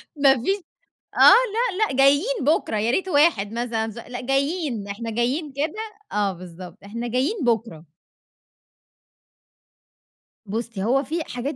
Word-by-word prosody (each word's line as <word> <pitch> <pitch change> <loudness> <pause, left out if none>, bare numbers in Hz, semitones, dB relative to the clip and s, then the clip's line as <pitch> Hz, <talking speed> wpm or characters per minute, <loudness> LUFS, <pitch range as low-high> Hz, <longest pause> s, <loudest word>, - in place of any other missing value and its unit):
ما 280 -2 +5
فيش 390 +6 +1 0.6
آه. - - -3
لأ، 445 -3 +3
لأ 265 - -4
جايين 285 - +4
بُكرة، 295 -6 +1
يا 220 +3 +1
ريت 375 +9 0
واحد 285 - +3
مثلًا 230 -1 -2
ز 220 - -11
لأ 245 +1 -7
جايين، 275 - -1
إحنا 225 +3 -5
جايين 255 +7 -1
كده 295 +3 -2 0.4
آه 205 -2 +1
بالضبط. 180 -1 -11
إحنا 230 +4 -5
جايين 275 - -1
بُكرة. 225 -9 -1 2.6
بُصّي، 220 -1 -4
هو 265 +6 +2
في 320 +5 -3
حاجات 265 +2 -5
250 Hz, 135 wpm, -23 LUFS, 220-305 Hz, 2.6 s, ما